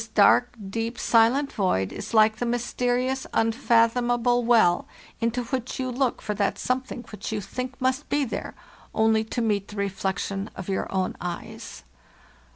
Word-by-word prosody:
"This -, -, -7 dB
dark, 245 Hz, 0 st, +4 dB
deep, 230 Hz, +3 st, -3 dB
silent 240 Hz, +7 st, +3 dB
void 95 Hz, -, 0 dB
is 210 Hz, -, -6 dB
like 220 Hz, -1 st, +5 dB
the 245 Hz, -, -2 dB
mysterious, 245 Hz, +2 st, -1 dB
un 225 Hz, 0 st, +3 dB
fathomable 240 Hz, 0 st, +2 dB
well 225 Hz, -7 st, +4 dB, 0.3 s
into 230 Hz, +2 st, 0 dB
which 250 Hz, +1 st, -4 dB
you 255 Hz, -1 st, -1 dB
look 255 Hz, 0 st, -1 dB
for 210 Hz, -, -2 dB
that 200 Hz, -1 st, 0 dB
something 255 Hz, -1 st, -2 dB
which 210 Hz, 0 st, -6 dB
you 215 Hz, -, -1 dB
think 250 Hz, +7 st, -6 dB
must 260 Hz, +2 st, 0 dB
be 290 Hz, -1 st, +1 dB
there, 230 Hz, -, -5 dB, 0.4 s
only 220 Hz, 0 st, +3 dB
to 235 Hz, +2 st, -2 dB
meet 205 Hz, -3 st, 0 dB
the 210 Hz, -, -10 dB
reflec 195 Hz, -2 st, -2 dB
tion 195 Hz, +1 st, -3 dB
of 190 Hz, 0 st, -7 dB
your 190 Hz, -, -2 dB
own 185 Hz, -1 st, -1 dB
eyes. 175 Hz, -1 st, -6 dB
230 Hz, 165 wpm, -25 LUFS, 205-250 Hz, 0.4 s, like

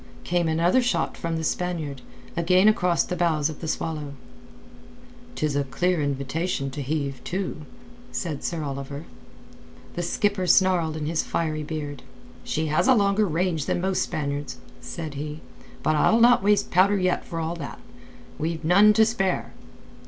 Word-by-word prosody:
Came 175 Hz, -1 st, +1 dB
another 170 Hz, +9 st, +3 dB
shot 245 Hz, 0 st, 0 dB
from 165 Hz, -1 st, -3 dB
the 160 Hz, -, -3 dB
Spaniard, 160 Hz, -5 st, -2 dB, 0.3 s
again 180 Hz, +4 st, +4 dB
across 180 Hz, -5 st, +3 dB
the 180 Hz, -, -4 dB
bows 160 Hz, -3 st, +1 dB
of 155 Hz, -, -11 dB
the 160 Hz, -, -4 dB
Swallow. 155 Hz, -3 st, -3 dB, 1.2 s
"'Tis 150 Hz, -2 st, -1 dB
a 140 Hz, -, +2 dB
clear 175 Hz, +5 st, 0 dB
invitation 140 Hz, +1 st, -2 dB
to 145 Hz, -, -5 dB
heave 140 Hz, -1 st, -3 dB
to," 185 Hz, -3 st, -3 dB, 0.5 s
said 155 Hz, -6 st, -4 dB
Sir 165 Hz, -3 st, -2 dB
Oliver. 140 Hz, +2 st, -5 dB, 0.9 s
The 175 Hz, -, -3 dB
skipper 185 Hz, +2 st, 0 dB
snarled 175 Hz, -5 st, +3 dB
in 155 Hz, -, -3 dB
his 160 Hz, +1 st, 0 dB
fiery 155 Hz, -2 st, -2 dB
beard. 145 Hz, -3 st, -5 dB, 0.4 s
"She 160 Hz, -, -1 dB
has 155 Hz, +9 st, +1 dB
a 260 Hz, -, +6 dB
longer 200 Hz, 0 st, +3 dB
range 165 Hz, -2 st, -1 dB
than -, -, 0 dB
most 190 Hz, +1 st, 0 dB
Spaniards," 145 Hz, -1 st, -3 dB, 0.2 s
said 160 Hz, -4 st, -6 dB
he. 150 Hz, +2 st, -6 dB, 0.4 s
"But 155 Hz, -, +2 dB
I'll 220 Hz, +9 st, +4 dB
not 240 Hz, -1 st, +6 dB
waste 205 Hz, +1 st, +2 dB
powder 195 Hz, +3 st, +4 dB
yet 185 Hz, -1 st, +1 dB
for 165 Hz, -, -5 dB
all 165 Hz, +1 st, -2 dB
that. 145 Hz, -, -7 dB, 0.6 s
We've 160 Hz, +1 st, -2 dB
none 200 Hz, +5 st, +6 dB
to 220 Hz, +1 st, +5 dB
spare." 195 Hz, -5 st, -1 dB
165 Hz, 160 wpm, -25 LUFS, 150-185 Hz, 1.2 s, a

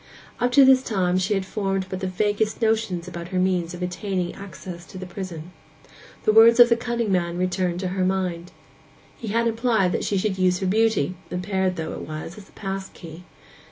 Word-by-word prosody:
Up 245 Hz, 0 st, +1 dB
to 275 Hz, +1 st, +8 dB
this 260 Hz, -1 st, +6 dB
time 185 Hz, -7 st, 0 dB
she 190 Hz, +3 st, 0 dB
had 195 Hz, -1 st, -1 dB
formed 195 Hz, -1 st, -2 dB
but 185 Hz, 0 st, -5 dB
the 190 Hz, -, -2 dB
vaguest 205 Hz, +3 st, 0 dB
notions 220 Hz, -6 st, 0 dB
about 170 Hz, -1 st, -7 dB
her 185 Hz, +1 st, -3 dB
means 180 Hz, -2 st, 0 dB
of 180 Hz, -, -6 dB
obtaining 180 Hz, 0 st, -2 dB
access 185 Hz, -3 st, -9 dB
to -, -, -10 dB
the 185 Hz, -, -6 dB
prison. 180 Hz, -3 st, -7 dB, 0.7 s
The -, -, +4 dB
words 230 Hz, +2 st, +7 dB
of 240 Hz, 0 st, +9 dB
the 235 Hz, -, +5 dB
cunning 235 Hz, -2 st, -2 dB
man 175 Hz, -2 st, 0 dB
returned 180 Hz, -1 st, -1 dB
to 185 Hz, -, -2 dB
her 185 Hz, 0 st, -1 dB
mind. 180 Hz, -2 st, -1 dB, 0.6 s
He 230 Hz, -, -8 dB
had 230 Hz, +3 st, +1 dB
implied 225 Hz, -5 st, +1 dB
that -, -, -1 dB
she 200 Hz, -, 0 dB
should 190 Hz, 0 st, -1 dB
use 180 Hz, -1 st, +3 dB
her 190 Hz, -, -3 dB
beauty, 205 Hz, -4 st, +2 dB, 0.2 s
impaired 185 Hz, 0 st, -1 dB
though 160 Hz, -2 st, -4 dB
it -, -, -6 dB
was, 155 Hz, +3 st, -6 dB
as 200 Hz, -, -15 dB
a -, -, -24 dB
pass 195 Hz, -1 st, -5 dB
key. 170 Hz, +1 st, -12 dB
190 Hz, 205 wpm, -24 LUFS, 180-215 Hz, 0.7 s, of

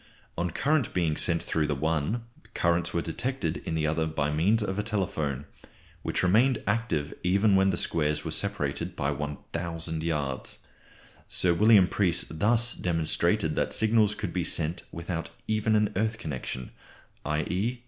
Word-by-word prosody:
On 85 Hz, +1 st, -1 dB
currents 140 Hz, -, +1 dB
being 85 Hz, -4 st, 0 dB
sent 85 Hz, +1 st, 0 dB
through 80 Hz, -2 st, 0 dB
the 75 Hz, -, 0 dB
one, 80 Hz, -, -1 dB, 0.3 s
currents 85 Hz, 0 st, +1 dB
were 85 Hz, -, -1 dB
detected 115 Hz, -2 st, -2 dB
in 80 Hz, -, -2 dB
the 80 Hz, -1 st, 0 dB
other 80 Hz, +1 st, +1 dB
by 75 Hz, -2 st, -1 dB
means 100 Hz, +9 st, +2 dB
of 95 Hz, -1 st, -2 dB
a -, -, +3 dB
telephone, 80 Hz, -, -2 dB, 0.6 s
which -, -, -1 dB
remained 115 Hz, +7 st, +3 dB
active 105 Hz, -9 st, 0 dB
even 100 Hz, +3 st, +3 dB
when 95 Hz, 0 st, +4 dB
the 90 Hz, -, 0 dB
squares 75 Hz, -3 st, 0 dB
were -, -, -3 dB
separated -, -, -1 dB
by 70 Hz, +1 st, 0 dB
1000 80 Hz, +3 st, -4 dB
yards. 75 Hz, -5 st, -2 dB, 0.7 s
Sir 90 Hz, -1 st, +3 dB
William 105 Hz, 0 st, +6 dB
Preece 90 Hz, -4 st, +1 dB
thus 115 Hz, +8 st, +2 dB
demonstrated 80 Hz, -3 st, +1 dB
that -, -, 0 dB
signals 110 Hz, -1 st, +3 dB
could 100 Hz, -5 st, -4 dB
be 90 Hz, -, 0 dB
sent 80 Hz, +1 st, -1 dB
without 85 Hz, 0 st, -4 dB, 0.2 s
even 110 Hz, 0 st, +2 dB
an 105 Hz, -1 st, +2 dB
earth 110 Hz, +3 st, 0 dB
connection, 65 Hz, -, -5 dB, 0.5 s
_i.e. 90 Hz, +11 st, -1 dB
85 Hz, 155 wpm, -28 LUFS, 80-105 Hz, 0.7 s, William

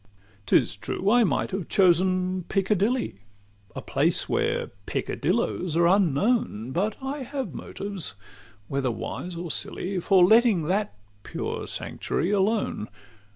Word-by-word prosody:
XXVII 100 Hz, 0 st, -31 dB
'T -, -, +6 dB
is -, -, -1 dB
true, 195 Hz, +2 st, -1 dB
I 240 Hz, 0 st, +6 dB
might 210 Hz, -, 0 dB
have 190 Hz, -2 st, -3 dB
chosen 185 Hz, 0 st, +2 dB
Piccadilly, 205 Hz, -, 0 dB, 0.6 s
A -, -, -6 dB
place -, -, +1 dB
where -, -, 0 dB, 0.2 s
peccadillos 175 Hz, -3 st, -1 dB
are 170 Hz, -, +4 dB
unknown; 180 Hz, -, +2 dB
But 200 Hz, +8 st, 0 dB
I 275 Hz, +2 st, -3 dB
have 260 Hz, -, -4 dB
motives, 195 Hz, -, -5 dB, 0.5 s
whether 135 Hz, -2 st, -1 dB
wise 145 Hz, -, -5 dB
or 170 Hz, -1 st, -5 dB
silly, 185 Hz, +5 st, -2 dB
For 185 Hz, 0 st, +5 dB
letting 220 Hz, -3 st, +5 dB
that 195 Hz, -, -1 dB, 0.3 s
pure -, -, -4 dB
sanctuary 180 Hz, -, -2 dB
alone. 205 Hz, -, 0 dB
185 Hz, 130 wpm, -26 LUFS, 165-210 Hz, 0.6 s, T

